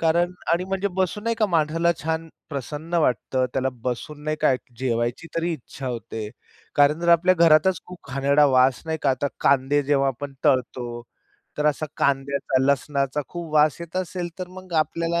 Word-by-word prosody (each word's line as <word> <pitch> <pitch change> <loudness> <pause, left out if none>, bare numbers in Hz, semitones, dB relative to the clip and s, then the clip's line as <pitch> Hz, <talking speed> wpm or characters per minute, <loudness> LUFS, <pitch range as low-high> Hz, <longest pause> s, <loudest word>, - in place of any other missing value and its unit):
कारण 170 +2 +2 0.2
आणि 175 +2 +1
म्हणजे 195 +1 -1
बसून 190 +2 0
नाही 230 0 +1
का 215 -2 +2
माणसाला 165 0 +2
छान 160 +1 -2 0.2
प्रसन्न 150 +4 -5
वाटतं. 130 -4 +1
त्याला 135 0 +1
बसून 135 +4 -4
नाही 155 0 -1
का 150 -3 +4
एक 125 - -2 0.2
जेवायची 120 +4 -1
तरी 170 +1 0
इच्छा 135 -2 -8
होते. 115 -3 -5 0.5
कारण 145 +2 +4
जर 170 - -1
आपल्या 180 +2 +4
घरातच 165 +2 +4
खूप 180 -6 -12
घाणेरडा 140 +2 +3
वास 130 -1 +3
नाही 160 0 -2
का, 135 - +3
आता 135 +2 0
कांदे 140 +1 +3
जेव्हा 140 -1 +2
आपण 135 +2 -5
तळतो 125 -1 +1 0.7
तर 150 - +1
असा 150 +1 +1
कांद्याचा, 135 -1 +1
लसणाचा 140 +1 +1
खूप 170 -3 -7
वास 150 0 +4
येत 170 +1 -7
असेल, 180 -1 -3
तर 180 -1 -5
मग 185 -1 -12
आपल्याला 165 +2 0
150 Hz, 175 wpm, -24 LUFS, 135-170 Hz, 0.7 s, का